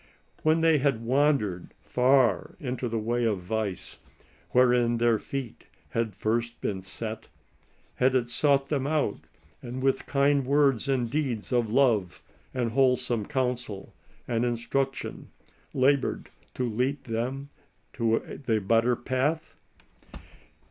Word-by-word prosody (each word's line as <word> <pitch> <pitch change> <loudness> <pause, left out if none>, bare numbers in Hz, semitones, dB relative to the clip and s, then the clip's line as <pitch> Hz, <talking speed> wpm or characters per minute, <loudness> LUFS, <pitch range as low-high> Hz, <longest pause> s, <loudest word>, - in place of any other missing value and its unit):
When 155 +1 +3
they 160 -2 +4
had 135 -5 +1
wandered 125 -9 +1
far 130 0 +2
in 125 -2 -3
the 120 -2 -3
way 120 +2 -1
of 110 -3 +1
vice, 100 +1 -4 0.5
wherein 125 -1 +3
their 115 -2 +3
feet 135 -2 -6 0.3
hs^d 115 -4 -1
first 115 +3 -1
been 95 -2 -3
set, 110 +3 -6 0.7
has 130 +1 +3
it 120 -2 +2
sought 140 +2 +2
them 140 -2 0
out, 150 - 0 0.4
and, 125 +1 -6
with 135 0 +1
kind 140 0 +3
words 140 -2 +2
and 130 -3 +1
deeds 125 -4 -2
of 120 -3 +1
love 115 -8 +2 0.3
and 120 -3 -1
wholesome 125 -3 +1
counsel 125 -7 -3 0.3
and 115 -1 0
instruction, 125 +3 -2 0.4
labored 135 +1 +1 0.2
to 125 - -1
lead 125 +5 -1
them 125 +5 -3 0.5
to 115 +2 -1
the 110 -2 +3
better 115 +4 +2
path 135 +6 -1
125 Hz, 125 wpm, -27 LUFS, 115-135 Hz, 0.7 s, they